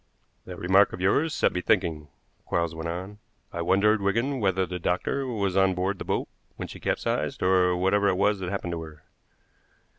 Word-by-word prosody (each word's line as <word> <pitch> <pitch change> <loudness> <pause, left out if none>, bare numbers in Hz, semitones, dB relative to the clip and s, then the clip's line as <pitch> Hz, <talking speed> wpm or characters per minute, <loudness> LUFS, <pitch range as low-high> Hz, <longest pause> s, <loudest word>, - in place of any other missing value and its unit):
"That 90 -1 -8
remark 95 +3 +4
of - - -6
yours 140 - +2
set - - +1
me 90 - -2
thinking," 85 -7 0 0.4
Quarles 85 -1 0
went 80 +1 -5
on. 95 +5 -6 0.3
"I 85 - -3
wondered, 100 +5 +3
Wigan, 115 +8 0
whether 95 -3 +1
the 90 0 -5
doctor 95 +11 -1
was 100 -6 -1
on 95 -1 +3
board 95 +2 -1
the - - -4
boat - - -1 0.3
when - - -6
she - - -10
capsized, - - -2
or 90 -1 +3
whatever 100 +3 +2
it 95 -2 +2
was 105 +1 +2
that 90 -1 -4
happened 95 -2 -3
to 85 - -4
her. 80 -1 -11
95 Hz, 190 wpm, -26 LUFS, 90-100 Hz, 0.4 s, remark